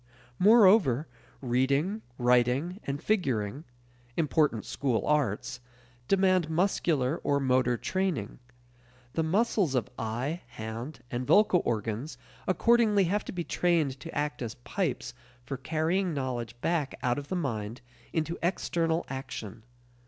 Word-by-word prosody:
Moreover, 190 - +6 0.4
reading, 140 - +1 0.2
writing, 125 - +2
and 140 +1 -4
figuring 135 - 0 0.5
important 150 - +1
school 130 -5 -1
arts 130 -4 0 0.5
demand 185 -4 +3
muscular 160 -5 +1
or 140 0 +2
motor 125 -2 +2
training. 180 - -2 0.7
The 165 - +1
muscles 185 - +1
of 120 -5 -1
eye, 125 +10 -2
hand, 115 +6 -7
and 125 +1 -3
vocal 205 -4 +5
organs 115 +6 -2 0.3
accordingly 215 0 +4
have 200 +4 0
to - - -5
be 175 -2 -3
trained 160 -7 +1
to 165 - -7
act 145 -4 -2
as 115 0 -4
pipes 145 -10 -2 0.3
for 130 +3 -4
carrying 160 +5 0
knowledge 120 -4 -3
back 160 -5 0
out 125 +1 +1
of 140 - -9
the 185 - -2
mind 115 - -3 0.3
into 165 +1 -2
external 170 -1 0
action. 125 -5 -6
145 Hz, 125 wpm, -29 LUFS, 125-175 Hz, 0.7 s, Moreover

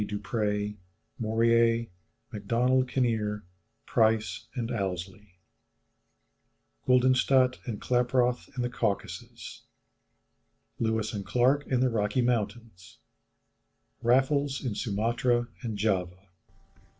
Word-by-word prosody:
Dupré, 105 0 -2 0.4
Morier, 115 +1 +3 0.5
Macdonald 120 +5 +1
Kinneir, 110 -5 0 0.4
Price, 110 -1 +1
and 120 -2 -3
Ouseley 95 -2 -5 1.5
Guldenstædt 130 0 +4
and 110 -4 -4
Klaproth 125 0 +1
in 125 - 0
the 120 - -1
Caucasus 110 -4 -4 1.2
Lewis 110 -1 -1
and 100 -2 -4
Clarke 125 +8 +2
in 125 -2 +1
the 130 - +3
Rocky 110 +3 0
Mountains 115 -5 -3 1.0
Raffles 135 +3 +2
in 120 - -1
Sumatra 120 +3 0
and 115 -5 -4
Java. 95 -2 -2
115 Hz, 90 wpm, -28 LUFS, 105-125 Hz, 1.5 s, Guldenstædt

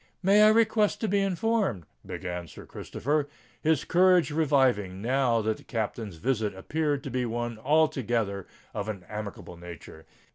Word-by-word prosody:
"May 200 +3 +5
I 215 - +8
request 220 -1 +3
to 220 - 0
be 200 0 +2
informed——" 195 - 0 0.2
began 90 -2 -5
Sir - - -12
Christopher, 145 +2 -2 0.3
his 155 -3 +2
courage 180 -2 +4
reviving 130 - +2
now 120 0 +1
that 110 0 0
the - - -16
Captain's 110 -3 -4
visit 105 +2 -1
appeared 145 +7 -1
to 135 - -6
be 125 0 0
one 120 -1 -3
altogether 120 - +1 0.3
of 105 0 -3
an 100 -4 -6
amicable 105 -4 -7
nature. 85 -2 -11
125 Hz, 150 wpm, -28 LUFS, 105-160 Hz, 0.3 s, I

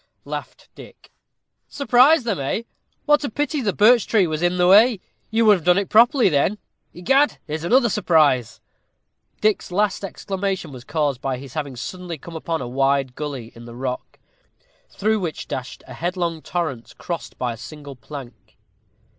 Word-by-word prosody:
laughed - - -7
Dick. - - -15 0.6
"Surprise 275 +3 +4
them, 225 -9 -2
eh? 140 +11 -2 0.4
What 295 0 +4
a 280 - -2
pity 290 +4 -2
the 210 -4 0
birch 220 +4 +4
tree 210 -5 +3
was 155 -1 -3
in 175 +1 +1
the 180 0 +3
way; 215 +3 +6 0.3
you 230 +1 +2
would 210 -2 +6
have 170 - -11
done 180 +2 +4
it 200 -1 -1
properly 235 +3 +5
then. 175 +5 +1 0.3
Egad, 270 - +2
here's 155 +1 -5
another 240 +7 +4
surprise." 150 - +2 0.8
Dick's 215 -3 +1
last 205 +2 0
exclamation 195 -3 -4
was 125 -2 -10
caused 145 -3 -1
by 135 -2 -2
his 130 0 -11
having 145 -4 -4
suddenly 175 +6 -6
come 165 +4 -11
upon 160 -2 -3
a - - -5
wide 135 +1 +1
gully 135 -5 -6
in 115 0 -12
the 120 0 -10
rock, 125 0 -5 0.7
through 215 +2 0
which 170 -5 -5
dashed 130 -1 -6
a - - -10
headlong 170 -2 -2
torrent, 155 -11 -4
crossed 125 -9 -6
by 125 -2 -2
a - - -8
single 145 +3 -10
plank. 125 -1 -11
170 Hz, 170 wpm, -22 LUFS, 135-210 Hz, 0.8 s, way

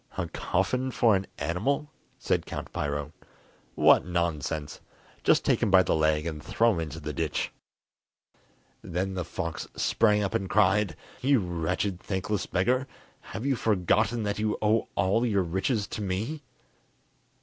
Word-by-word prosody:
"A 90 -3 -1
coffin 125 +11 -1
for 115 -4 +3
an 95 0 -2
animal?" 140 - -1 0.3
said - - -1
Count - - -6
Piro. 75 0 -2 0.6
"What - - +6
nonsense! 80 -4 -2 0.4
just - - +4
take - - +2
him - - +2
by 95 -1 +6
the - - +1
leg 80 0 +2
and 80 -3 -4
throw 115 +8 +2
him 85 - -2
into 80 0 -5
the 75 -1 -5
ditch." 75 -1 -2 1.3
Then 95 +3 -2
the 90 -1 -2
fox 85 -1 -4
sprang 105 -2 +2
up 100 +1 -2
and 95 -4 -1
cried: 95 +1 +3 0.3
"You 135 0 +4
wretched, 90 +1 -2
thankless 95 +1 -2
beggar; 125 +8 +1 0.3
have 110 - -7
you 140 -1 +2
forgotten 110 +2 +1
that 105 0 -2
you 105 0 0
owe 110 +1 +2
all 100 +5 +2
your 100 -6 +2
riches 95 +6 0
to - - -5
me?" 105 +11 -2
95 Hz, 150 wpm, -28 LUFS, 85-110 Hz, 1.3 s, What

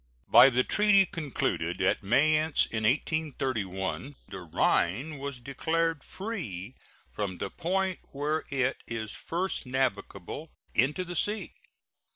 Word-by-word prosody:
By 120 +4 +9
the 125 0 +2
treaty 210 +1 +4
concluded 125 - -2
at 95 +3 +2
Mayence 155 +8 +3
in 110 -1 -1
1831 130 - -1
the 95 - -6
Rhine 95 - +1
was 140 -2 -5
declared 160 +4 -1
free 130 - -5 0.4
from 100 -4 -3
the 100 - -4
point 190 +1 -1
where 150 +3 -1
it 130 -1 0
is 110 -2 -4
first 175 -4 -3
navigable 130 0 -2 0.2
into 145 - +2
the 180 0 -6
sea. 210 +5 0
135 Hz, 120 wpm, -29 LUFS, 110-165 Hz, 0.4 s, By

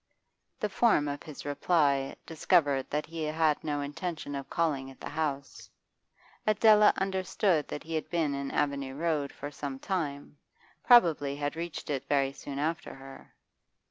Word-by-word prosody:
The 210 - 0
form 195 -7 +3
of 145 0 -4
his 150 -3 -10
reply 145 -2 +1
discovered 155 -5 +2
that 150 +1 -1
he 165 0 -7
had 155 0 +1
no 145 -1 -1
intention 150 +1 -5
of 140 -1 -5
calling 145 -5 0
at 135 - -14
the - - -6
house; 140 -3 -3 0.8
Adela 215 0 +6
understood 190 -3 0
that 150 - -6
he 165 - -7
had 155 - -2
been 160 -4 0
in 140 0 -3
Avenue 140 -2 -1
Road 150 -2 -1
for 145 - -7
some 140 -2 -5
time, 145 -5 -4 0.4
probably 165 - +5
had 145 +1 -3
reached 165 -2 -5
it 135 -2 -3
very 140 -2 +2
soon 140 0 -7
after 160 +5 -2
her. 135 0 -13
150 Hz, 155 wpm, -29 LUFS, 140-170 Hz, 0.8 s, Adela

